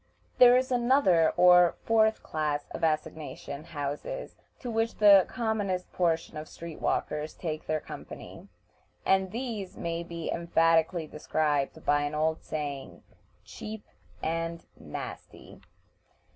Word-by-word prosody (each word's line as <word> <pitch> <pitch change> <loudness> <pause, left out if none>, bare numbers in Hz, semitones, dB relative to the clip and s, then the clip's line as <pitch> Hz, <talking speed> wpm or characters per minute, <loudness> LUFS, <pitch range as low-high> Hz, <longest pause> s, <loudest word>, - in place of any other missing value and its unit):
There 245 0 +9
is 255 0 0
another 240 - +4
or 180 -1 +6
fourth 220 -1 +3
class 150 -2 -2
of - - -7
assignation 155 -2 -3
houses 155 - -5 0.2
to 245 - -6
which 225 +1 0
the 200 -3 +7
commonest 205 -6 -2
portion 165 -3 0
of 155 +1 -6
street 170 -1 -9
walkers 150 +1 -1
take 155 -3 -5
their 155 0 0
company, - - -10 0.6
and 190 0 +3
these 225 -6 -5
may 170 -1 -3
be 170 -1 -5
emphatically 165 0 +2
described 150 -2 -1
by 145 0 +3
an 145 +1 -2
old 160 +1 0
saying, 140 - -5 0.4
"Cheap 215 0 -8 0.4
and 165 +1 -2
nasty." 80 +4 -9
165 Hz, 120 wpm, -29 LUFS, 155-205 Hz, 0.6 s, There